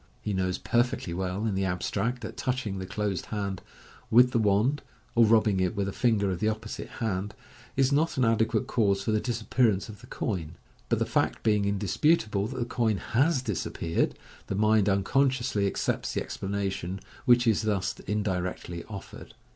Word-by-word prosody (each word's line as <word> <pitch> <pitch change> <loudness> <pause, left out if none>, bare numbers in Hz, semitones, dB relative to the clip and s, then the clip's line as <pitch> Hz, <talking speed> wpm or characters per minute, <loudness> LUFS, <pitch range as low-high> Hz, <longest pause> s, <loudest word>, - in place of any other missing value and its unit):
He 105 - -3
knows 95 -1 0
perfectly 120 -7 0
well, 95 +3 -2
in 110 - 0
the 95 0 0
abstract, 115 +7 -1
that - - -6
touching 125 -7 -2
the 95 - -5
closed 100 -1 -2
hand 100 -3 -3 0.5
with 125 +2 +6
the 120 - +2
wand, 110 +7 +2 0.3
or 115 -1 +6
rubbing 105 -3 +4
it 90 +1 0
with 100 -1 -1
a 100 - -5
ringer 105 -5 +3
of 90 - -3
the 110 - +2
opposite 110 0 -5 0.2
hand, 100 -1 -2 0.4
is 135 0 +3
not 155 +2 +1
an 130 - +3
adequate 115 -1 +2
cause 100 -4 +1
for 110 - 0
the 110 - +2
disappearance 115 -3 +1
of 105 - -10
the - - -13
coin; 85 -6 -3 0.3
but - - +2
the - - +1
fact - - 0
being 105 -2 +2
indisputable 105 - +1
that 130 - -7
the 120 - -1
coin 115 -3 0
has 130 - +1
disappeared, 85 -6 -1 0.3
the - - -2
mind 105 0 +3
unconsciously 120 +1 +1
accepts - - -2
the - - 0
explanation 95 -2 -3 0.3
which 120 0 +5
is 110 -3 +3
thus 100 -3 0
indirectly 90 -4 -2
offered. 100 -3 -10
105 Hz, 175 wpm, -28 LUFS, 95-115 Hz, 0.5 s, with